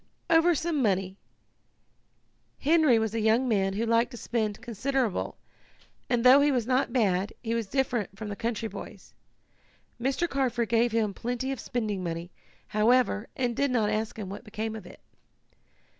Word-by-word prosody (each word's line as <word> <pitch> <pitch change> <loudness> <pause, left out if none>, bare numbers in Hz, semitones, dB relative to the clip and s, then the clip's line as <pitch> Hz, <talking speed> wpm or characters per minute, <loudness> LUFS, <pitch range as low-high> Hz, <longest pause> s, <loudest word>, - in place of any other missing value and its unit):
"Over 330 +1 +5
some 315 -1 -1
money. 190 -4 0 1.4
Henry 305 -4 +4
was 220 -1 -1
a 230 - -1
young 220 +4 +3
man 195 -4 +1
who 220 +4 -1
liked 230 +1 +2
to 245 - -9
spend 215 -3 -2
considerable, 240 -1 -2 0.7
and 240 -2 +1
though 260 +3 +8
he 290 0 +4
was 245 -4 0
not 255 +2 +1
bad 200 -5 +1
he 230 -1 -1
was 230 -3 -1
different 245 -5 -1
from 220 - -6
the 205 - -4
country 230 +1 -2
boys. - - -10 0.9
Mr. 275 +7 0
Carford 245 -6 -1
gave 235 +1 +3
him 220 -3 0
plenty 245 +5 -3
of 270 - -4
spending 210 -6 -3
money, 170 +1 -4 0.4
however, 220 0 +2
and 245 -2 -1
did 280 +3 +1
not 225 -4 +1
ask 220 +1 -2
him 210 -3 -5
what 195 +4 -7
became 220 0 -4
of 205 -5 -9
it. - - -14
230 Hz, 165 wpm, -28 LUFS, 210-255 Hz, 1.4 s, though